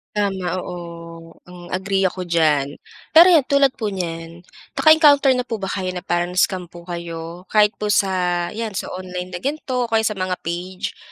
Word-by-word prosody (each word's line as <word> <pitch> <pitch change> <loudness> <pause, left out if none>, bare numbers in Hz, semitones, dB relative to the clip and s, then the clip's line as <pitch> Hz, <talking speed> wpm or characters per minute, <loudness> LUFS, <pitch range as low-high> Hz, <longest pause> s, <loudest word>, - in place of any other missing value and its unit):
Tama, 190 -3 -1
oo. 170 -2 -9
Hmm, 175 -1 -12
agree 195 +1 -1
ako 185 0 -6
diyan. 155 -5 +1 0.4
Pero 335 +3 +9
'yan 320 -7 +5
tulad 280 0 +4
po 210 -3 -3
niyan, 165 -2 -5 0.3
naka-encounter 300 -3 +6
na 250 - -2
po 225 -4 -5
ba 195 - -3
kayo 185 -2 -3
na 180 - -5
parang 175 +1 -1
na-scam 185 0 +1
po 175 0 -13
kayo? 170 0 -7
Kahit 210 0 +4
po 210 -1 0
sa 180 -3 +1
'yan 220 +1 -5
sa 195 - -4
online 180 -1 -6
na 180 - -5
gan'to 260 - -2
o - - -9
kaya 225 0 +3
sa 215 -2 -1
mga 185 0 -1
page, 180 +2 -5
185 Hz, 185 wpm, -21 LUFS, 175-210 Hz, 0.4 s, Pero